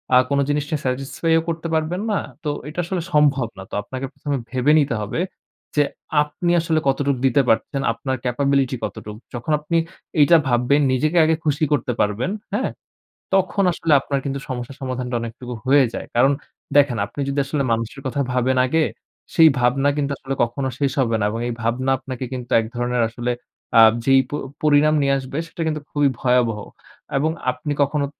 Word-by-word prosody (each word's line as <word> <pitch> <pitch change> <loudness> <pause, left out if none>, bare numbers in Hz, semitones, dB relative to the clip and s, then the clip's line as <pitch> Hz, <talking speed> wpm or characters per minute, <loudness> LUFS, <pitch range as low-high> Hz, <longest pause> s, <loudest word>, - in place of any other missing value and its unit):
আ - - +9
কোন 140 0 +1
জিনিস 145 0 +1
নিয়ে 155 - -1
স্যাটিসফাই 135 +5 -1
ও - - -1
করতে 165 0 -3
পারবেন 160 +4 0
না। 200 - +1 0.2
তো 150 - -1 0.2
এটা 155 +3 -6
আসলে 180 0 -2
সম্ভব 140 -5 +3
না। 95 - -7
তো - - -19
আপনাকে 130 +5 -6
প্রথমে 145 -2 -3
ভেবে 130 +4 +2
নিতে 140 -5 +1
হবে 105 +10 -3 0.6
যে, 150 - +5 0.4
আপনি 170 +4 -2
আসলে 160 -1 +1
কতটুক 135 0 +1
দিতে 135 +1 +4
পারছেন। 135 +4 +1
আপনার 130 +3 -3
ক্যাপাবিলিটি 135 +1 +1
কতটুক। 105 -1 -6 0.2
যখন 120 +6 -4
আপনি 165 +3 -1 0.4
এইটা 165 +3 +7
ভাববেন, 125 +4 +3
নিজেকে 155 +6 +1
আগে 160 0 +3
খুশি 150 +1 +1
করতে 125 -3 +1
পারবেন, 105 - 0 0.2
হ্যাঁ? - - 0 0.7
তখন 195 +1 +2
আসলে 165 -2 +1
আপনার 140 -1 -1
কিন্তু 140 0 -2
সমস্যা 125 +1 -4
সমাধানটা 125 -1 -3
অনেকটুকু 120 +2 -6
হয়ে 135 0 +5
যায়। - - -5
কারণ, 135 +4 +5 0.5
দেখেন 140 -5 +4
আপনি 145 - -7
যদি 140 +1 -1
আসলে 140 0 -1
মানুষের 115 +4 -2
কথা 135 +2 -2
ভাবেন 130 +1 +1
আগে, 160 +5 +2 0.5
সেই 160 -1 +8
ভাবনা 135 +3 +3
কিন্তু 140 -1 0
আসলে 135 +1 -4
কখনো 130 +3 -2
শেষ 140 -2 +1
হবে 115 -3 +1
না। 105 - +1
এবং 115 - -4
এই 120 - -2
ভাবনা 125 +4 0
আপনাকে 130 -1 -6
কিন্তু 125 -1 -6
এক 115 - -2
ধরনের 120 0 0
আসলে 120 +1 -3 0.5
আ - - +10 0.2
যেই 135 0 +6
প - - -19 0.3
পরিণাম 150 0 +4
নিয়ে 140 0 +2
আসবে 135 +2 -6
সেটা 165 0 -8
কিন্তু 155 -1 -2
খুবই 145 -1 +3
ভয়াবহ। 125 -4 +2 0.6
এবং 155 +3 +1 0.2
আপনি 125 +4 -5
কখনো 140 0 +1
135 Hz, 185 wpm, -21 LUFS, 125-150 Hz, 0.7 s, আ